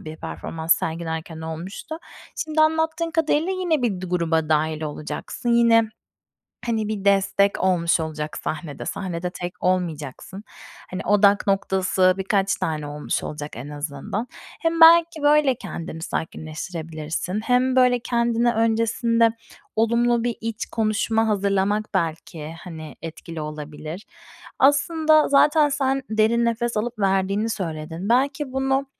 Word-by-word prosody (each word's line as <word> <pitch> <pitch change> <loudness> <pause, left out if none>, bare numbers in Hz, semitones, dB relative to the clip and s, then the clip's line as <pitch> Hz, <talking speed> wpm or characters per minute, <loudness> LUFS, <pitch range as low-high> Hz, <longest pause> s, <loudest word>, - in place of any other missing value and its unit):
bir 155 0 -8
performans 160 - -1
sergilerken 160 0 -3
olmuştu. 165 - -6 0.5
Şimdi 310 0 0
anlattığın 320 +1 +2
kadarıyla 320 +1 +1
yine 350 -6 0
bir 205 -7 0
du 185 - -6
gruba 165 -3 0
dâhil 155 0 +1
olacaksın 150 +9 -5
yine, 235 -1 +5 0.8
hani, 220 -3 -1
bir 205 -2 -4
destek 200 0 +3
olmuş 175 -3 +2
olacak 155 -1 -4
sahnede. 150 -2 -5
Sahnede 180 -2 -3
tek 180 0 -6
olmayacaksın. 180 +1 -2 0.5
Hani, 185 - -4
odak 205 0 +4
noktası 190 -1 +2
birkaç 195 0 +1
tane 155 -2 -3
olmuş 145 0 -3
olacak 150 0 -6
en 130 +5 -7
azından. 145 - -4 0.3
Hem 330 0 0
belki 330 -1 +7
böyle 290 -3 +4
kendini 165 -7 -7
sakinleştirebilirsin 160 +3 -4
hem, 250 +2 +2
böyle, 250 -1 +4
kendine 235 0 +1
öncesinde 230 +1 +2 0.5
olumlu 235 +1 +2
bir 240 -2 -1
iç 225 -1 -3
konuşma 220 0 0
hazırlamak 200 0 +1
belki, 160 -1 -3
hani, 160 -5 -9
etkili 165 0 -7
olabilir. 150 +4 -7 0.5
Aslında 310 +3 +4
zaten 295 +2 +4
sen 270 -1 0
derin 220 +2 +2
nefes 235 0 -1
alıp 225 +1 -3
verdiğini 195 +3 +1
söyledin. 165 -1 -4
Belki 275 +3 +1
bunu, 270 +1 +1
200 Hz, 125 wpm, -23 LUFS, 160-240 Hz, 0.8 s, belki